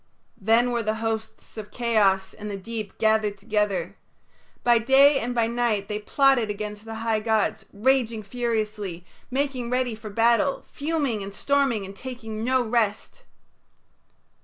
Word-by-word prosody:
Then 230 +4 +3
were 235 -1 0
the 215 0 -1
hosts 220 0 -5
of 210 -1 -7
chaos 200 -5 +1
and 210 0 -7
the 200 - -4
deep 215 0 -6
gathered 215 -2 +2
together. 205 -1 -1 0.7
By 240 -1 +5
day 270 +4 +5
and 245 +2 -3
by 230 -1 +3
night 230 -4 0
they 210 0 -2
plotted 265 0 +3
against 210 +1 -5
the 225 0 -6
high 220 -1 +2
gods, 220 -1 0
raging 230 0 +1
furiously, 210 -5 -3 0.2
making 260 -2 -2
ready 250 -1 0
for 215 0 -8
battle, 230 +5 +2
fuming 285 -7 -2
and 195 0 -6
storming 270 -2 +1
and 195 +1 -10
taking 225 -2 -6
no 255 +1 +2
rest. 230 - -1
225 Hz, 145 wpm, -25 LUFS, 210-245 Hz, 0.7 s, By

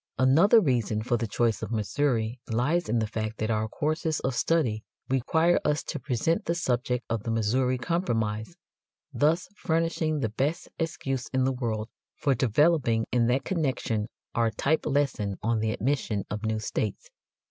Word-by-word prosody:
Another 155 - +6
reason 120 - 0
for 120 +1 +1
the 115 0 -1
choice 115 +1 0
of - - -4
Missouri 115 +2 0
lies 125 +8 +1
in 120 - +2
the 110 - +1
fact 110 +1 -4
that 110 +1 -1
our 110 0 0
courses 155 +5 -1
of 130 - -1
study 125 -8 +1 0.3
require 160 +7 +3
us 150 0 +1
to 150 - -4
present 150 - 0
the 170 - 0
subject 125 -6 -1
of 115 -2 -1
the 115 - -5
Missouri 125 +4 +1
Compromise, 115 - -1 0.6
thus 150 +8 +2
furnishing 165 -3 0
the 115 - 0
best 140 +10 -2
excuse 135 -6 -2
in 130 0 0
the 135 +1 +1
world 115 -4 -2 0.3
for 140 - +1
developing 125 -1 +2
in 120 -2 +3
that 130 +3 +1
connection 130 - -1 0.3
our 115 -1 +2
type 140 +8 0
lesson 130 -9 0
on 115 0 +1
the 110 0 0
admission 115 -5 -1
of 105 0 -3
new 110 0 0
states. 110 -1 -3
125 Hz, 165 wpm, -27 LUFS, 110-150 Hz, 0.6 s, Another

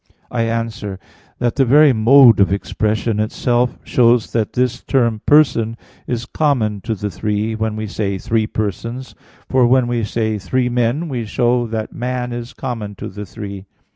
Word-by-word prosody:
I 115 -2 0
answer 115 -3 -3 0.4
that, 120 +1 -1
The 135 - +5
very 145 +2 +6
mode 120 0 +6
of 95 -1 +4
expression 105 +2 -1
itself 120 +3 0
shows 120 -2 +2
that 110 -3 -1
this 125 0 0
term 115 -5 0
"person" 115 -7 +3 0.3
is 120 -1 -2
common 120 -9 0
to 115 - -1
the 105 +1 -4
three 105 +3 -2
when 110 -1 -2
we 110 0 -4
say 100 -2 -2
"three 110 +3 0
persons"; 115 +5 -4 0.3
for 130 -2 +3
when 130 0 +4
we 120 -1 -1
say 110 0 -1
"three 125 +5 0
men" 125 +7 0
we 125 -6 -3
show 120 +2 +1
that 110 -1 -4
"man" 125 0 -3
is 120 +2 -6
common 115 -6 -5
to - - -7
the 105 +1 -8
three. 100 -2 -8
115 Hz, 170 wpm, -18 LUFS, 110-125 Hz, 0.4 s, very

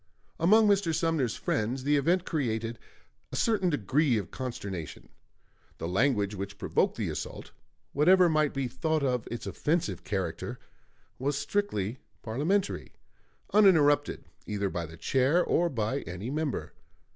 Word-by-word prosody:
Among 210 +6 +5
Mr. 195 -5 +2
Sumner's 160 -9 0
friends 120 +5 -1
the 145 +2 +3
event 170 +6 +2
created 115 -7 -2 0.5
a - - -5
certain 210 -5 +2
degree 145 - +2
of 100 -6 -4
consternation. 100 - -6 0.7
The 80 - -4
language 105 +1 +1
which 100 0 -6
provoked - - 0
the - - -1
assault, - - -6 0.4
whatever 180 +5 +5
might 155 -3 +2
be 135 -2 -2
thought 155 +5 -1
of 125 -4 0
its 120 - -5
offensive 150 - -1
character, 95 -4 -3 0.6
was 140 +2 0
strictly 140 - -1 0.2
parliamentary, 160 - -1 0.6
uninterrupted 150 -8 +4 0.2
either 100 -2 -1
by 85 -2 -3
the 80 +2 -12
chair 135 - +2
or 175 +1 +2
by 120 0 -1
any 95 +5 -6
member. 155 -1 -2
135 Hz, 135 wpm, -29 LUFS, 105-165 Hz, 0.7 s, Among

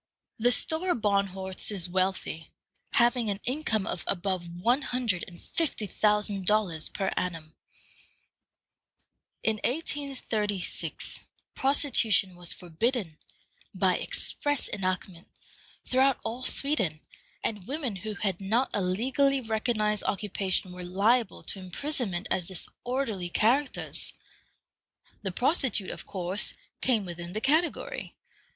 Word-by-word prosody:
The 240 +2 +5
Stora 320 +4 +2
Barnhorst 195 -2 0
is 185 -4 -3
wealthy, 185 -3 -1 0.4
having 240 -1 +4
an 200 -1 -1
income 245 -6 +1
of - - -2
above 185 -2 0
one 230 +11 +2
hundred 245 -10 0
and 175 -2 -12
fifty 310 -9 0
thousand 210 -1 +1
dollars 200 -7 +2
per 195 -1 -1
annum. 165 -3 -3 1.9
In 220 -1 +2
1836, 245 - -1 0.3
prostitution 255 - +3
was 175 -1 -1
forbidden, 180 0 -2 0.6
by 185 -1 +3
express 290 -1 0
enactment, 185 -3 -2 0.6
throughout 265 +1 +4
all 240 +3 -3
Sweden, 200 - +2 0.4
and 205 -3 -2
women 265 -7 -2
who 215 +2 -5
had 195 -2 -1
not 225 +7 +1
a 205 - +2
legally 260 +9 +2
recognized 220 -2 0
occupation 195 -2 0
were 180 0 -7
liable 205 +5 +2
to 195 - -5
imprisonment 190 - -2
as 180 -2 +1
disorderly 215 0 -2
characters. 255 +10 +1 1.1
The 190 - -2
prostitute, 245 - +2
of - - -8
course, 190 +1 -1 0.3
came 230 -6 +2
within 175 0 -6
the 215 - -2
category. 330 - 0
210 Hz, 110 wpm, -29 LUFS, 185-250 Hz, 1.9 s, The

